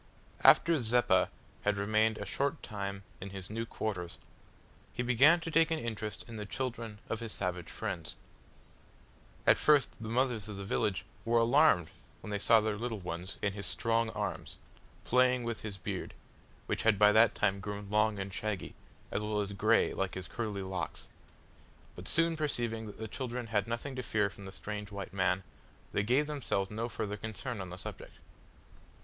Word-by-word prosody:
After 165 -4 +6
Zeppa 110 -5 +3 0.3
had 105 0 +1
remained 110 +2 +2
a - - -5
short 140 +3 -1
time 100 -2 -4 0.2
in 95 - -5
his 95 0 -8
new 115 +1 -3
quarters, 90 -7 -4 0.7
he 125 - -2
began 135 +8 +6
to 165 +1 -4
take 165 +1 +4
an 160 - +1
interest 110 -6 -4
in 115 -2 -7
the 105 - -4
children 115 -3 -4
of 115 - -2
his 115 -2 -5
savage 90 -3 -3
friends. 90 -7 -4 1.3
At - - +6
first 150 -5 +3
the 110 - -5
mothers 120 -3 +1
of 105 - -6
the 100 - -5
village 100 0 0 0.2
were 115 +1 +2
alarmed 115 - +5 0.3
when 105 - -7
they 105 - -1
saw 115 +2 +6
their 110 -1 -1
little 115 -1 -2
ones 90 0 -6
in 100 -1 +1
his 100 -2 -5
strong 115 +5 +1
arms, - - -4 0.5
playing 125 0 +3
with 115 -1 -3
his 105 -3 -5
beard, 90 - -5 0.5
which - - -1
had 110 -2 +4
by 105 +1 +7
that 110 +2 +6
time 100 -1 +1
grown 105 0 -5
long 105 0 +3
and 95 0 -4
shaggy, 105 -2 -3 0.4
as - - 0
well 105 0 -1
as 100 -1 -2
grey 110 +3 +3
like 95 -1 -2
his 95 -2 -5
curly 105 -4 -3
locks; 95 -1 -4 0.9
but - - -8
soon 165 0 +3
perceiving 120 -7 -1
that 105 - -9
the 110 - -5
children 125 +1 -4
had 110 -2 0
nothing 120 +4 -3
to 130 - -2
fear 105 -4 +1
from 100 - -11
the 95 - -7
strange 105 +1 -5
white 100 -2 -6
man, 95 0 +1 0.5
they - - +2
gave 125 +8 +3
themselves 130 -10 -1
no 115 +3 -2
further 105 -2 -3
concern 110 +1 -4
on 95 - -6
the 90 - -7
subject. - - -8
110 Hz, 180 wpm, -32 LUFS, 100-120 Hz, 1.3 s, by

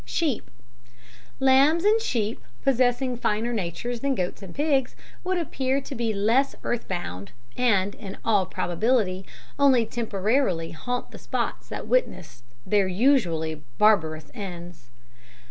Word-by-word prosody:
Sheep 260 - -1 0.9
Lambs 275 +5 +5
and 430 +2 +4
sheep, 220 - -1 0.2
possessing 255 -1 +2
finer 230 +1 0
natures 220 +5 -3
than 275 +2 0
goats 180 0 -3
and 190 -3 -10
pigs, 280 -3 +1 0.3
would 370 0 0
appear 270 -5 0
to 275 - -8
be 230 -3 -1
less 225 +7 +2
earth 240 -1 -2
bound, 100 - -5 0.2
and, 200 -5 +2
in 195 -3 -9
all 205 -5 +3
probability, 190 +1 0 0.3
only 265 -5 +5
temporarily 215 -5 0
haunt 245 +10 -4
the - - -10
spots - - -3
that - - -5
witnessed 180 - -1 0.2
their 205 -2 +3
usually 180 - +1
barbarous 160 -8 +3
ends. 175 - -8
225 Hz, 130 wpm, -25 LUFS, 180-265 Hz, 0.9 s, Lambs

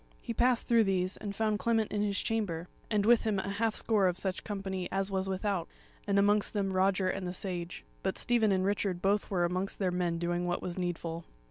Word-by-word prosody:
He 235 - -5
passed 245 +1 +2
through 230 -2 +5
these, 185 -1 0
and 200 -1 -5
found 215 -1 0
Clement 225 -2 +1
in 210 - 0
his 200 -1 0
chamber, 185 -7 -2 0.2
and 210 -2 +1
with 235 +1 +6
him 215 -3 0
a 190 - -2
half 220 +2 0
score 210 -4 +2
of 180 -1 0
such 190 -1 -3
company 195 -3 -4
as 195 0 0
was 190 0 -1
without, 190 -2 -1 0.4
and 200 -1 +2
amongst 205 +1 +3
them 195 -2 0
Roger 190 0 +2
and 185 0 -2
the 180 - -3
Sage; 180 -2 -4 0.2
but 190 - -2
Stephen 230 -3 +2
and 190 -1 +2
Richard 195 -2 0
both 200 +3 +1
were 180 -3 +1
amongst 185 +3 -2
their 190 -3 0
men 175 -2 0
doing 175 +1 -1
what 175 - 0
was 175 -1 -3
needful. 170 -2 -3
195 Hz, 220 wpm, -31 LUFS, 180-210 Hz, 0.4 s, with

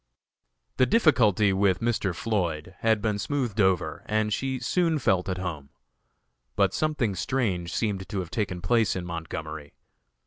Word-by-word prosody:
The 130 - +4
difficulty 110 - +4
with 95 -1 +2
Mr. 110 -6 0
Floyd 90 -7 -2
had 110 -2 +2
been 105 -2 0
smoothed 120 -5 -1
over 95 -3 +1
and 110 0 +1
she 135 +3 -1
soon 165 +6 +1
felt 95 -8 +1
at 95 - -2
home. 80 -7 -5 0.9
But - - +2
something 150 -9 0
strange 95 -5 -1
seemed 100 -1 -2
to 105 - -4
have 90 -2 -5
taken 95 -6 -2
place 110 +3 +2
in 90 -1 -4
Montgomery. 80 -3 -6
100 Hz, 145 wpm, -26 LUFS, 90-120 Hz, 0.9 s, The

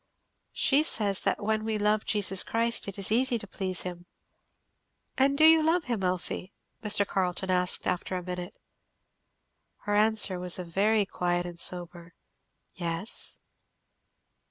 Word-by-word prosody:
"She 285 +1 +3
says 205 -10 0
that - - 0
when 215 +1 0
we 220 -1 -2
love 210 0 +1
Jesus 195 -3 +2
Christ 230 -1 0
it 200 - -6
is 195 +1 -3
easy 245 +2 +2
to 210 - -8
please 190 -2 -4
him." 175 -1 -8 1.1
"And 275 +1 +2
do 310 - +6
you 320 0 +7
love 325 +2 +2
him, 235 -7 -3
Elfie?" 185 +1 -3 0.3
Mr 205 -1 +4
Carleton 185 0 -1
asked 180 0 +1
after 180 +1 -2
a 180 - -6
minute. 180 +1 -6 1.2
Her 205 - -2
answer 210 -3 +3
was 180 -1 -1
a 180 - -5
very 205 +5 +1
quiet 175 -2 -2
and 175 -1 -7
sober 175 -1 -1 0.6
"Yes." 170 +4 -4
195 Hz, 145 wpm, -28 LUFS, 180-220 Hz, 1.2 s, you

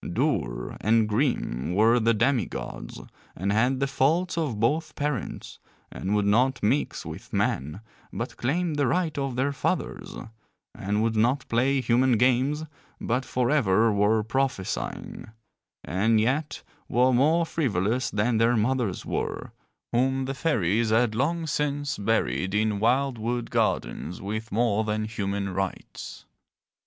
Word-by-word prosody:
Dour - - -1
and 110 +1 +3
grim 105 - -1
were 115 +4 +5
the 115 0 +2
demi 125 +3 +2
gods - - -7 0.4
and 100 +3 -1
had 125 +5 +2
the 140 - +2
faults 160 +6 +1
of 150 -10 -2
both 155 +7 0
parents, 145 -7 -4 0.3
and 100 +3 -2
would 105 -1 +1
not 125 +6 +2
mix 125 +8 0
with - - -9
men 75 +9 -1 0.3
but - - -5
claimed 155 +5 -1
the 145 -2 +2
right 165 +4 0
of 135 -2 -2
their 135 +3 +1
fathers, - - -3 0.6
and 105 +3 -1
would 115 0 0
not 120 +5 +1
play 130 +4 +2
human 125 0 +3
games 130 +6 +2 0.3
but 125 +3 -1
forever 120 -5 +2
were 105 +2 +2
prophesying, 130 -3 -3 0.6
and 110 +5 +2
yet 135 +7 -1 0.3
were 125 +2 +3
more 155 +7 +3
frivolous 120 - 0
than 110 +2 +1
their 115 +1 +3
mothers 115 -3 0
were, - - -3 0.4
whom 130 +2 +1
the 135 - -3
fairies 115 - +1
had 110 0 +3
long 160 +8 0
since 145 -1 -2
buried 95 - 0
in 105 -1 +1
wild 125 +3 +1
wood 120 +2 -3
gardens 80 +8 -1
with 110 +3 -5
more 110 -1 +1
than 110 0 -1
human 100 -2 -3
rites. 95 0 -5
120 Hz, 140 wpm, -26 LUFS, 105-135 Hz, 0.6 s, were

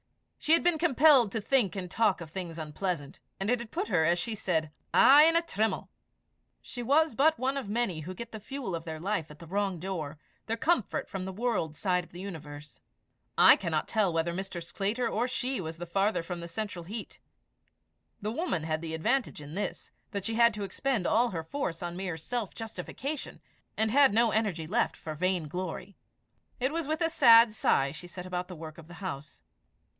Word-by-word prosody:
She 310 - +3
had 330 - +5
been 345 -2 +2
compelled 285 - +5
to 225 - 0
think 220 -3 +1
and 185 -2 -4
talk 215 -3 +2
of 165 -2 -9
things 175 -3 -5
unpleasant, 155 -1 -4 0.2
and 195 +4 0
it 245 - +2
had 235 -1 -7
put 215 - -3
her, 175 -6 +3
as 170 +2 +3
she 200 +6 -2
said, 160 -7 -1 0.2
a' 295 +4 +8
in 330 - +1
a 335 - +4
trim'le. 220 -8 -1 0.7
She 245 - -8
was 290 +4 +3
but 310 +7 +3
one 265 +3 0
of 275 -6 -3
the - - -5
many 215 -7 0
who 180 +4 -7
get 235 +3 -7
the 220 - -7
fuel 245 -2 -5
of 165 -1 -3
their 160 -2 -6
life 185 -2 -1
in 150 - -11
at - - -25
the 170 - -10
wrong 195 +1 -1
door, 165 -5 -4 0.3
their 225 +1 -1
comfort 305 - 0
from 190 -1 -5
the 190 - -4
world 200 -7 -1
side 180 +1 0
of - - -18
the 175 - -10
universe. 150 -6 -9 0.6
I - - +9
cannot 165 -4 -2
tell 210 -5 +2
whether 165 +1 0
Mr. 190 -1 -5
Sclater 205 +8 -1
or 235 +3 0
she 255 -3 -2
was 160 -1 -6
the 175 - -6
farther 195 +2 +1
from 175 +1 -5
the 170 - -6
central 180 -1 -5
heat. 215 +5 -7 1.0
The 210 - -1
woman 240 - -1
had 155 0 -2
the 160 -1 -4
advantage 240 - 0
in 145 0 -9
this, 205 +4 -4 0.2
that 200 -2 -4
she 225 - -2
had 235 -1 +4
to 210 - -4
expend 230 0 -1
all 235 +6 +3
her 165 -5 -4
force 170 - -4
on 175 0 -4
mere 180 -3 -3
self 225 +6 -4
justification, 260 +5 -6 0.4
and 220 0 +2
had 270 -4 +5
no 230 0 +4
energy 205 -8 0
left 220 +9 0
for 155 - -6
vain 180 0 0
glory. 180 +3 -5 0.6
It 260 +4 0
was 330 -3 -2
with 315 +2 -1
a 330 - +3
sad 230 -7 +7
sigh 135 -9 +2
she 170 +4 -9
set 180 +1 -8
about 180 0 -3
the 180 - -8
work 160 0 -9
of 160 - -13
the 175 - -11
house. 150 -6 -7
195 Hz, 215 wpm, -29 LUFS, 170-235 Hz, 1.0 s, I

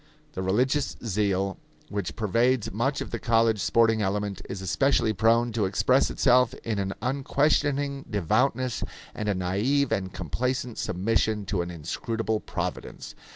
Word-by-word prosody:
The 95 - -4
religious 125 +10 +1
zeal 100 -2 0 0.3
which 100 -3 -3
pervades 115 +1 +1
much 135 +8 -1
of - - -5
the 120 - -3
college 115 -2 +2
sporting 115 -1 +3
element 100 0 -2
is 95 - -4
especially 110 +4 +2
prone 115 +4 +3
to 110 -2 0
express 95 +1 +2
itself 125 -1 +3
in 110 -3 -2
an 95 0 -2
unquestioning 140 +1 +1
devoutness 120 - 0 0.3
and 105 0 -3
a 100 - +1
naive 105 +10 +1
and 95 -1 -1
complacent 120 - -3
submission 105 +2 0
to 95 -1 -1
an 85 - -4
inscrutable 110 +7 -3
Providence. - - -5
110 Hz, 140 wpm, -26 LUFS, 100-125 Hz, 0.3 s, sporting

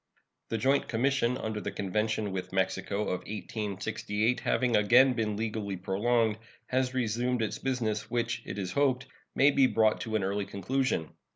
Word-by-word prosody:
The 115 - -1
joint 135 +5 +2
commission 125 +1 +1
under 110 -3 -3
the - - -3
convention 105 +1 -1
with 95 -1 -4
Mexico 95 +2 -1
of 90 -4 -1
1868, 105 +1 -2
having 125 -2 +1
again 125 +5 +6
been 110 -3 -1
legally 105 -3 -3
prolonged, 110 +4 +1 0.3
has 130 0 0
resumed 120 0 0
its 110 - -3
business, 110 -5 -2
which, 120 -1 -1
it - - -6
is 95 -3 -3
hoped, 135 -3 +1 0.3
may 140 +2 +5
be 135 -2 +5
brought 110 -3 +2
to 110 -1 -3
an 105 - +1
early 100 +1 -1
conclusion. 110 - -1
110 Hz, 160 wpm, -29 LUFS, 105-125 Hz, 0.3 s, again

